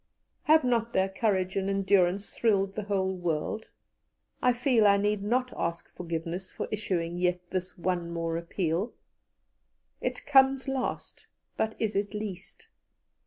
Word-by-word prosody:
Have 315 0 +6
not 235 -2 +1
their 190 0 +2
courage 190 -2 0
and 195 0 0
endurance 195 0 +2
thrilled 195 -4 +2
the 210 -1 -4
whole 190 -2 0
world? 175 +4 -2 0.7
I 250 - +5
feel 245 -3 +3
I 200 0 +6
need 205 0 +1
not 250 +5 0
ask 170 0 -4
forgiveness 170 +2 -4
for - - -5
issuing 175 -5 -2
yet 180 0 -1
this 185 0 -3
one 175 -1 -1
more 165 -1 -2
appeal. 170 +4 -1 1.1
It - - -3
comes 270 -1 +5
last, 270 -1 -3 0.3
but 220 0 -1
is 220 -2 -1
it 205 +1 -1
least? 200 - -6
195 Hz, 140 wpm, -29 LUFS, 180-220 Hz, 1.1 s, Have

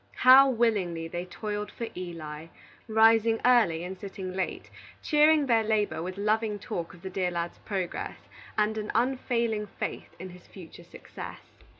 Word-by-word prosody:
How 265 +2 +9
willingly 205 -9 0
they 175 +2 -5
toiled 210 +2 -5
for 235 - -5
Eli! 165 -3 -7 0.4
rising 225 0 +4
early 220 -10 +4
and 185 +1 -7
sitting 190 -2 -6
late, 190 0 -4 0.3
cheering 300 -1 +4
their 230 -4 +3
labor 215 -5 0
with 185 +2 -5
loving 215 +1 0
talk 170 -3 -5
of 175 - -19
the 190 - -5
dear 185 -1 0
lad's 170 -1 -4
progress, 190 -4 -4 0.4
and 215 +1 +1
an 210 - -5
unfailing 235 -3 0
faith - - -6
in 185 +1 -8
his 180 0 -15
future 175 -2 -12
success. 170 - -11
205 Hz, 155 wpm, -28 LUFS, 180-225 Hz, 0.4 s, How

